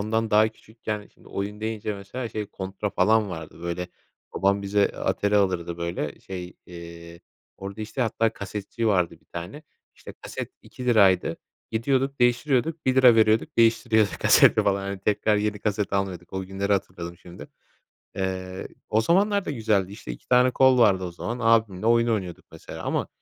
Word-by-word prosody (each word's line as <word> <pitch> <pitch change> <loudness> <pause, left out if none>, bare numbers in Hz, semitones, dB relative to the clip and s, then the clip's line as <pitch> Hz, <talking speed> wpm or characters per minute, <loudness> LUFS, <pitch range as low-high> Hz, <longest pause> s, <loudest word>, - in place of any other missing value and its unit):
ondan 110 +1 -1
daha 110 +1 +5
küçükken 110 -1 -7
şimdi - - -19
oyun 105 +2 -5
deyince 110 -1 -3
mesela 100 +5 -6
şey 105 -2 -4
Contra 95 +2 -4
falan 105 +2 +3
vardı, 80 0 -8
böyle, 85 +1 -3 0.5
babam 100 +1 +1
bize, 100 +1 0
eee, - - +1
Atari 105 0 0
alırdı. 90 -4 0
Böyle, 85 -4 -4
şey, 90 -2 -7
eee, 85 -1 -11 0.4
orada, 100 +2 -7
işte, 110 +5 -5
hatta 115 0 0
kasetçi 105 +3 -4
vardı 90 -4 +1
bir - - -34
tane, 90 - -8 0.3
işte, - - -11
kaset - - -6
₺2 100 -9 +2 0.3
gidiyorduk 135 +4 0
değiştiriyorduk, 130 +6 +1
₺1 130 -2 +6
veriyorduk, 110 0 +2
değiştiriyorduk 115 -2 +3
kaseti - - +6
falan. 100 -1 +1
Hani, 100 -1 -4
tekrar 105 +1 +1
yeni 105 0 -1
kaset 105 -1 -2
almıyorduk. 95 -3 -3
O 95 0 -3
günleri 95 +2 -2
hatırladım 90 -3 -3
şimdi. 90 +1 -12 0.7
Eee, 95 -1 -4 0.2
o 110 - +2
zamanlar 200 - +2
da - - -3
güzeldi, 110 -7 0
işte, 105 - -8
2 - - -13
tane 125 0 +5
kol 130 0 +4
vardı 100 -6 +4
o 90 - -4
zaman. 115 +7 -5
Abimle 110 -3 +2
oyun 115 0 +4
oynuyorduk 95 -6 -2
mesela - - -9
ama - - -1
105 Hz, 165 wpm, -25 LUFS, 95-115 Hz, 0.7 s, ₺1